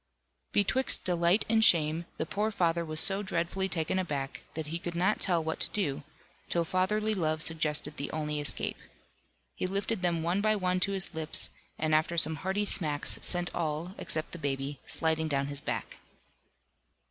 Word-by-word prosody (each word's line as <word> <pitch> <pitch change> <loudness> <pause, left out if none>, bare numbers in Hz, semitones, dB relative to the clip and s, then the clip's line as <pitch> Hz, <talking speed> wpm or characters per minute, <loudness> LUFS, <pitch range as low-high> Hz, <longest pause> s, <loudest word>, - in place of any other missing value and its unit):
Betwixt 260 +6 +2
delight 175 +3 +3
and 220 0 +3
shame, 165 -3 +5
the - - -2
poor 210 +6 -1
father 170 -5 +1
was 155 -1 +1
so 195 +4 +4
dreadfully 190 0 -2
taken 175 +1 0
aback, 140 -7 -3
that 160 -1 -3
he 165 +3 -4
could 170 0 -5
not 190 +5 +1
tell 175 -4 +2
what 160 0 -3
to - - +3
do, 150 -9 -1 0.5
till 170 -1 +2
fatherly 210 +5 0
love 155 -5 -1
suggested 155 -2 0
the 140 - -3
only 150 -1 -3
escape. 145 -3 -1 0.7
He - - -3
lifted 200 +2 -2
them 170 -2 0
one 175 +4 0
by 215 0 +2
one 185 -2 0
to 195 +2 +1
his 195 -1 0
lips, 160 -1 0 0.3
and 155 0 0
after 155 +2 +2
some 160 -1 +5
hearty 190 +5 -1
smacks 150 -7 +1
sent 175 -1 +2
all 165 +2 -3
(except 155 0 -2
the 170 - -7
baby) 140 -1 -3
sliding 160 -1 0
down 140 -2 0
his 145 0 -5
back. - - -4
170 Hz, 175 wpm, -30 LUFS, 155-190 Hz, 0.7 s, shame